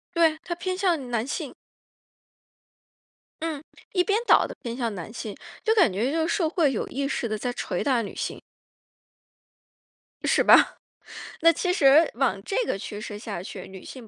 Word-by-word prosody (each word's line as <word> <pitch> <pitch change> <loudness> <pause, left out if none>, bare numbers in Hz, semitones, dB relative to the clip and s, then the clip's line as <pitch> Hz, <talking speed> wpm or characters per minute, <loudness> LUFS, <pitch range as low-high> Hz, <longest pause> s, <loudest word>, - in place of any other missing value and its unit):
对， 325 -2 +4
他 350 - -3
偏 370 +1 -3
向 335 -10 0
男 235 -1 -1
性。 275 - -4 1.9
嗯， 315 -3 -3 0.3
一 360 -2 +3
边 410 +3 +1
倒 - - +6
地 - - -9
偏 235 0 -5
向 235 -4 -2
男 180 +3 -7
性。 220 -3 -6 0.3
就 445 - +3
感 365 - +5
觉 225 +9 0
就 320 0 0
是 - - 0
社 335 -5 +1
会 315 -4 +2
有 230 - -2
意 275 +1 -2
识 245 - -2
地 215 -1 -2
在 245 +4 -2
锤 - - -3
打 260 -4 +2
女 210 - -7
性。 - - -4 1.8
是 - - +3
吧？ - - +6 0.7
那 330 +1 +7
其 360 +3 -1
实 295 +1 +6
往 235 -7 0
这 390 - -4
个 - - -1
趋 205 +1 -7
势 210 -2 -7
下 205 -6 -6
去， - - -8
女 190 -1 -11
性 250 -4 -10
270 Hz, 190 characters per minute, -25 LUFS, 225-335 Hz, 1.9 s, 那